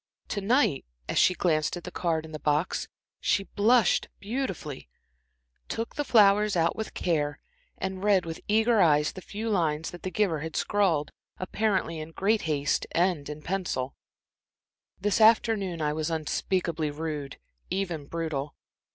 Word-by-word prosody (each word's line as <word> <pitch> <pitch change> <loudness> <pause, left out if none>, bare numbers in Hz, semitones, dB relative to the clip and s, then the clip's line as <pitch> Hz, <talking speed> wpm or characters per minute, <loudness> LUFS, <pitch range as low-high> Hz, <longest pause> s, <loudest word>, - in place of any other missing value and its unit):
To 200 - -2
night, 230 - +2 0.2
as - - +1
she 180 - +5
glanced 155 -1 +1
at 175 - -8
the - - -7
card 160 -2 -1
in 160 - -11
the 155 - -6
box, 150 +3 0 0.3
she 205 -1 +1
blushed 215 +1 +3
beautifully, 200 - -4 0.8
took 225 +1 -3
out - - -21
the 295 - +1
flowers 210 -4 +5 0.2
with 220 - -6
care, 150 -4 0 0.4
and 190 0 -4
read 200 -4 +3
with 165 -1 -6
eager 220 +1 +4
eyes 150 -3 +4
the 185 - -9
few 215 +4 -5
lines 160 -7 0
that 175 - -10
the 185 - -3
giver 185 -4 +1
had 160 +1 -6
scrawled, 180 -8 +1 0.3
apparently 185 -4 -1
in 155 +1 -8
great 210 +5 +2
haste 145 -1 0
and 170 -5 +1
in 150 0 -7
pencil: 170 -8 -2 1.0
"This 205 +3 +1
afternoon 215 -6 +4
I 150 0 +1
was 155 +1 -2
unspeakably 165 0 -1
rude 150 -2 -5 0.3
even 175 -7 -2
brutal. 150 -3 -3
175 Hz, 150 wpm, -28 LUFS, 155-205 Hz, 1.0 s, she